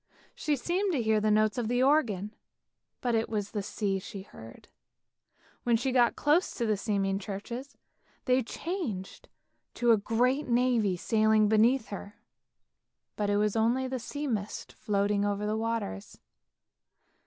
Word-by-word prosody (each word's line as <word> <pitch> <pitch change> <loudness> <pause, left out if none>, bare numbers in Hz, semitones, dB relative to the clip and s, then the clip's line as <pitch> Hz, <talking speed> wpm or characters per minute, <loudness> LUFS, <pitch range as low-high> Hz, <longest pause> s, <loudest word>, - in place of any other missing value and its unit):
She 300 - 0
seemed 360 +8 -1
to 270 - +1
hear 220 -1 +2
the 215 - +2
notes 215 +2 +2
of 230 - -1
the 245 +2 +2
organ, 225 -8 +2 0.7
but 245 -2 0
it 225 0 +1
was 205 -2 -2
the 210 - -2
sea 195 -1 -2
she 195 0 -8
heard. 115 - -13 0.9
When 235 -1 +2
she 255 +3 -1
got 245 -2 +3
close 305 +5 +2
to 235 - -1
the 215 -1 +2
seeming 195 -2 -1
churches, 235 +8 -7 0.5
they 255 0 +3
changed 245 - -5 0.5
to 240 -1 +3
a 225 - +6
great 250 +7 +1
navy 240 -6 +2
sailing 215 +1 +3
beneath 220 +4 +3
her; 200 0 -7 1.0
but 205 -1 -1
it 205 - +2
was 210 0 +1
only 235 +4 +2
a 260 0 -3
sea 290 +5 -5
mist 215 -6 -3
floating 200 0 0
over 205 0 -1
the 210 +1 0
waters. 220 - -3
220 Hz, 155 wpm, -29 LUFS, 205-250 Hz, 1.0 s, a